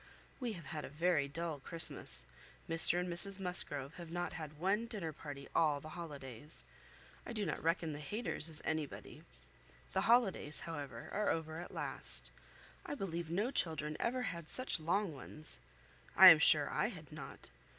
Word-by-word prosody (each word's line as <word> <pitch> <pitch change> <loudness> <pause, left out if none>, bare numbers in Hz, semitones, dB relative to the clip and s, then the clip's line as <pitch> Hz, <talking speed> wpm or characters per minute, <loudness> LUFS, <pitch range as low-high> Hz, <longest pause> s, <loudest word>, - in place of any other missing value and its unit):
We 245 -4 -3
have 170 -6 -9
had 155 +2 -5
a - - -7
very 155 -1 +1
dull 160 +1 -4
Christmas; 165 +4 +2 0.4
Mr 165 +2 +6
and 180 - -2
Mrs 185 +3 +2
Musgrove 155 -6 +1
have 170 -2 -9
not 175 0 -3
had 155 -1 -7
one 200 +7 0
dinner 190 -9 -1
party 140 -2 -9
all 150 -3 +2
the 155 - -10
holidays. 145 -4 -7 0.6
I - - -7
do 210 -3 -2
not - - -3
reckon 165 -1 0
the 145 - -6
Hayters 165 0 +1
as 155 - -5
anybody. 155 -3 -4 0.7
The - - +1
holidays, 215 -9 +2
however, 140 -7 -7
are 210 0 0
over 160 0 -2
at 175 - -9
last: - - -2 0.5
I - - -5
believe 170 - -4
no 205 +9 -1
children 155 - +2
ever 250 +1 -1
had 170 -8 -5
such 255 -8 +1
long 175 +3 0
ones. 150 +3 -5 0.6
I - - +12
am - - +8
sure - - +6
I - - +1
had - - -9
not. - - -9
165 Hz, 170 wpm, -35 LUFS, 150-185 Hz, 0.7 s, I